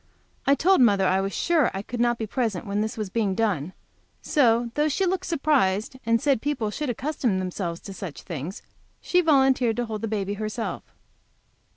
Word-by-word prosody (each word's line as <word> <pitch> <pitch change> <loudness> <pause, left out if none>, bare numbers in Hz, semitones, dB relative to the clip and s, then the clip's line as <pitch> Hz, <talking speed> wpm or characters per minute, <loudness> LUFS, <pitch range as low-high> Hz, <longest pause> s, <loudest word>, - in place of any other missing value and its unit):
I 280 - +6
told 370 0 +4
mother 200 -5 +4
I 190 +1 +2
was 195 0 -2
sure 325 0 +2
I 195 - -3
could 240 +2 -6
not 240 0 +2
be 225 - -3
present 220 -4 -2
when 205 +1 -1
this 220 +1 -3
was 210 -4 -4
being 205 -4 0
done, 185 -8 0 0.5
so, 235 -5 +2
though 300 +3 +1
she 380 +7 0
looked 375 +1 -1
surprised, 265 - +1
and 230 0 +3
said 275 -3 +1
people 260 -7 -1
should 295 +4 -3
accustom 245 -4 -1
themselves 180 -2 -3
to 195 - -8
such 190 -5 -8
things, 170 +1 -6 0.4
she 360 - +2
volunteered 265 -7 +3
to 240 +1 -1
hold 220 0 -4
baby 205 -2 -2
herself. 215 +2 -4
225 Hz, 185 wpm, -25 LUFS, 195-270 Hz, 0.5 s, I